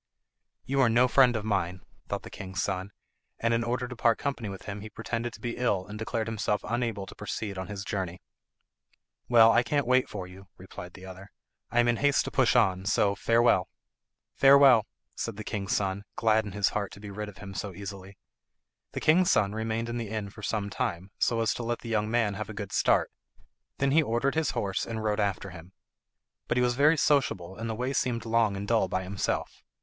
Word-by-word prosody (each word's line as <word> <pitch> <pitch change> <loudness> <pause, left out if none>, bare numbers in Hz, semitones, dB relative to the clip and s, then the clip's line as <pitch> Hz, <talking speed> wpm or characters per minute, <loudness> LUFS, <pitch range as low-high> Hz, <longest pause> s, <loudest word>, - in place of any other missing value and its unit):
"You 135 +1 +1
are 125 - +5
no 120 +3 +4
friend 125 -2 +5
of 110 -1 -3
mine," 95 -3 -1 0.3
thought - - -3
the - - -10
king's 95 0 -6
son, 95 +1 -2 0.5
and 115 0 +1
in 115 0 +1
order 125 +1 -2
to 125 - -8
part 115 -1 +3
company 135 -7 -3
with 95 -1 -8
him 100 0 -6
he 110 - -8
pretended 115 +2 -4
to - - -11
be 120 -2 -4
ill 100 -7 0
and 105 +2 -8
declared 110 0 -2
himself 105 -2 -1
unable 115 -3 -2
to - - -11
proceed 105 -1 -5
on 95 0 -5
his 100 -1 -5
journey. 95 -3 -3 1.1
"Well, 115 -2 +7
I 120 - +5
can't 140 +4 0
wait 130 +1 +3
for 95 -3 -5
you," 95 +2 -13
replied 90 -1 -10
the 95 - -11
other; 95 +1 -10 0.4
"I 120 - +1
am 120 - +4
in 120 -1 +2
haste 145 +1 +2
to - - -5
push - - +3
on, 95 0 +3
so 100 0 +3
farewell." 115 -2 +3 0.6
"Farewell," 135 -4 +6 0.3
said 115 -3 -4
the 105 - -5
king's 100 -2 -2
son, 100 0 -1
glad 110 -1 +2
in 100 - -7
his 105 -1 +2
heart 100 -2 -3
to - - -11
get 100 -1 -8
rid 105 +1 -5
of 100 - -14
him 100 -1 -9
so 100 +1 -4
easily. 100 0 -8 0.8
The - - -4
king's 175 +3 +4
son 100 -1 +3
remained 110 +1 -2
in 120 0 -3
the 115 -3 -4
inn 105 -2 -4
for 110 - -12
some 105 -1 -2
time, 95 -6 -3
so 115 -1 +2
as 115 - +1
to - - -5
let 120 0 -2
the 115 - -7
young 105 -1 0
man 115 -3 +1
have 105 +1 -5
a 110 - -7
good 100 -1 -6
start; - - +2 0.7
them 140 0 +1
he 160 +3 +5
ordered 130 0 0
his 160 -1 +1
horse 95 -2 -1
and 110 -1 -4
rode 105 0 0
after 100 -1 -1
him. 90 +1 -12 0.7
But - - 0
he 125 - +3
was 120 0 +2
very 150 +5 +4
sociable 125 - +1
and 115 +2 -5
the 110 - -2
way 125 +4 -2
seemed 120 -4 -1
long 115 -3 +2
and 100 +1 -5
dull 115 -4 +2
by 95 +1 -2
himself. 95 +1 -3
110 Hz, 220 wpm, -28 LUFS, 100-120 Hz, 1.1 s, Well